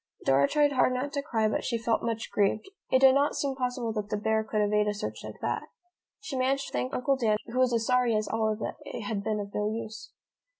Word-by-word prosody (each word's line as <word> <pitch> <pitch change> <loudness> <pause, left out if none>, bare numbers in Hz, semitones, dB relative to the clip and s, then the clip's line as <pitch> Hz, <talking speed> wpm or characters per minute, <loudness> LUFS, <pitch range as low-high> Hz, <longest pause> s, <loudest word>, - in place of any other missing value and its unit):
Dora 135 +1 +4
tried 290 - +3
hard 255 -1 +3
not 280 +3 -3
to 280 - -1
cry 225 -5 0
but 215 - -1
she 235 - -1
felt 230 0 0
much 225 -1 -3
grieved. 205 - +1 0.2
It 260 - +3
did 265 -1 +8
not 280 +2 +2
seem 280 -1 -1
possible 250 -3 -2
that 210 -2 -3
the 210 - -1
bear 220 +1 +1
could 215 0 -2
evade 210 0 +2
a 210 - 0
search 110 - -5
like 110 0 -8
that. 120 - -2 0.5
She 415 -10 -6
managed 265 +1 +1
to - - -19
thank 125 +1 -1
Uncle 270 +2 +1
Dan, 220 -4 +2
who 240 +2 -3
was 255 -1 +4
as 230 -1 +1
sorry 250 -2 +3
as 215 0 0
Olive 220 -1 0
that - - -4
it - - -6
had 205 -1 -3
been 215 0 -1
of 200 -1 -6
no 210 0 0
use. 220 0 -6
225 Hz, 250 wpm, -28 LUFS, 210-255 Hz, 0.5 s, did